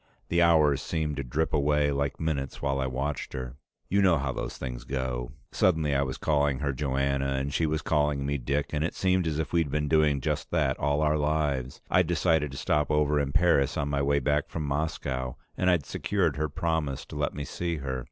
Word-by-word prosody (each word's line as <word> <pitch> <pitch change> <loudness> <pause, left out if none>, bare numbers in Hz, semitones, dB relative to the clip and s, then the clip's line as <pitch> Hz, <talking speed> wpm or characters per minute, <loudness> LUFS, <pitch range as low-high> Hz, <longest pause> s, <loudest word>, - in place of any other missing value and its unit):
The 85 +1 +2
hours 80 -5 +4
seemed 80 -3 -2
to 70 - -2
drip 75 +6 -1
away 75 0 +2
like 70 0 -1
minutes 70 -4 -2
while 70 -1 -1
I 65 - 0
watched 70 +2 -3
her. 65 0 -6 0.3
You 100 +2 +2
know 90 -4 +5
how 70 -2 -1
those - - -5
things 60 -2 -5
go. 65 -2 -3 0.2
Suddenly 80 -5 +2
I 70 - +2
was 65 -1 -2
calling 70 -3 +1
her 70 -1 -1
Joanna 70 0 0
and 70 +1 -2
she 80 - +1
was 75 0 -1
calling 75 -3 +1
me 70 0 -1
Dick, 70 +4 -2
and 75 0 0
it 85 - -2
seemed 95 -2 +1
as 75 -2 -1
if 80 +1 -3
we'd 85 -4 +2
been 75 +1 -1
doing 75 -2 +3
just - - -2
that - - +1
all 70 +1 +1
our 75 0 +2
lives. 75 -4 -1
I'd 90 -1 +4
decided 80 -3 +2
to 70 - -8
stop 75 +1 +1
over 75 -1 +2
in 70 -1 -1
Paris 80 -4 +3
on 70 - -1
my 70 -1 0
way 70 +1 +2
back 75 +1 0
from 80 - -4
Moscow, 70 -3 -2 0.2
and 90 - +1
I'd 85 -6 +2
secured - - 0
her 75 +1 -1
promise 75 -2 -2
to - - -10
let 75 0 -1
me 75 0 -4
see 85 +1 -3
her. 65 -3 -3
75 Hz, 220 wpm, -28 LUFS, 70-80 Hz, 0.3 s, know